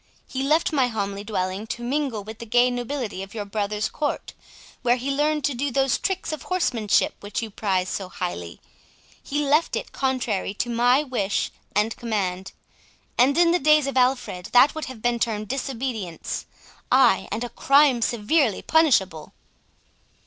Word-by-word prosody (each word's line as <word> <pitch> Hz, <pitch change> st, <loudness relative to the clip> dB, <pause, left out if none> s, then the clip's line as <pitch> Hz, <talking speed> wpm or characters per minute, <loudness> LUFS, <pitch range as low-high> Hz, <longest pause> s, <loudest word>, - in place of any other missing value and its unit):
He 265 Hz, -, -4 dB
left 310 Hz, +4 st, +2 dB
my 265 Hz, -4 st, +3 dB
homely 200 Hz, -3 st, -3 dB
dwelling 200 Hz, 0 st, -3 dB
to 240 Hz, -, -5 dB
mingle 260 Hz, -4 st, -1 dB
with 220 Hz, +2 st, -9 dB
the 235 Hz, -, -7 dB
gay 245 Hz, +2 st, +4 dB
nobility 245 Hz, -4 st, -4 dB
of 195 Hz, +3 st, -9 dB
your 210 Hz, -2 st, -4 dB
brother's 210 Hz, +1 st, -2 dB
court, 295 Hz, -2 st, -3 dB, 0.5 s
where 245 Hz, -1 st, +3 dB
he 260 Hz, +3 st, -3 dB
learned 300 Hz, +1 st, +1 dB
to 275 Hz, +1 st, +1 dB
do 275 Hz, +4 st, -1 dB
those 270 Hz, 0 st, +1 dB
tricks 380 Hz, -3 st, -2 dB
of 305 Hz, -, -5 dB
horsemanship 245 Hz, -, +1 dB
which 205 Hz, +3 st, -4 dB
you 220 Hz, -, -6 dB
prize 190 Hz, -3 st, -1 dB
so 190 Hz, 0 st, -4 dB
highly. 90 Hz, -, -5 dB, 0.6 s
He 290 Hz, +1 st, -2 dB
left 300 Hz, +4 st, +2 dB
it -, -, -4 dB
contrary 245 Hz, -7 st, -1 dB
to 240 Hz, +3 st, -2 dB
my 245 Hz, +4 st, +3 dB
wish 225 Hz, -8 st, -1 dB, 0.2 s
and 210 Hz, +2 st, +1 dB
command; 190 Hz, -5 st, -2 dB, 0.6 s
and 270 Hz, +5 st, +4 dB
in 340 Hz, -1 st, +5 dB
the 355 Hz, -, +2 dB
days 305 Hz, 0 st, +4 dB
of 275 Hz, -, -3 dB
Alfred 250 Hz, -8 st, +1 dB
that 250 Hz, +4 st, +6 dB
would 315 Hz, -, -4 dB
have 250 Hz, -4 st, -10 dB
been 240 Hz, -1 st, +1 dB
termed 215 Hz, -3 st, -2 dB
disobedience—ay, 250 Hz, -, -1 dB
and 230 Hz, -, -2 dB
a 245 Hz, -, -4 dB
crime 275 Hz, -2 st, +4 dB
severely 235 Hz, -, +1 dB
punishable." 195 Hz, -, +2 dB
240 Hz, 165 wpm, -24 LUFS, 210-275 Hz, 0.6 s, that